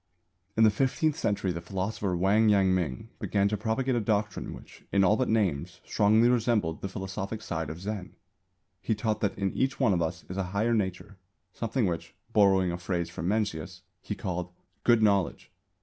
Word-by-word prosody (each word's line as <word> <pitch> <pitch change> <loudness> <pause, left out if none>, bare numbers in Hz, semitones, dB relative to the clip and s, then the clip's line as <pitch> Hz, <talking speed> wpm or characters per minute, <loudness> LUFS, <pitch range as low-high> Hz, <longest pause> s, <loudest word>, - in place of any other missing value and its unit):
In 110 - +6
the 110 - +7
fifteenth 135 +7 +1
century 100 - 0
the 85 -1 -4
philosopher 95 +1 -2
Wang 105 +5 +4
Yang 95 -2 +4
ming 80 -9 -2
began 100 -1 +1
to 105 - 0
propagate 115 +5 0
a 120 - +2
doctrine 105 -2 -1
which, - - -12
in 100 -1 +4
all 95 +3 +5
but 130 +2 0
names, 95 -11 0
strongly 110 +3 +4
resembled 115 -9 +1
the 100 - -3
philosophic 95 +2 -4
side 80 -2 -3
of 80 +2 -6
Zen. 100 -1 -5 0.7
He 110 - 0
taught 110 0 -1
that 100 -2 0
in 100 -1 -1
each 130 +1 0
one 120 -7 +4
of 85 - +1
us 80 0 -3
is 90 - -6
a 95 - 0
"higher 115 +3 +2
nature," 95 -2 -2 0.4
something 115 +1 -1
which, 85 -3 -3 0.2
borrowing 95 -3 +4
a 85 - -4
phrase 85 -2 -2
from 85 0 -4
Mencius, 100 -6 -2 0.2
he - - -4
called 90 -1 -4 0.3
"Good 120 -2 +4
Knowledge." 100 -4 +1
100 Hz, 185 wpm, -28 LUFS, 90-110 Hz, 0.7 s, the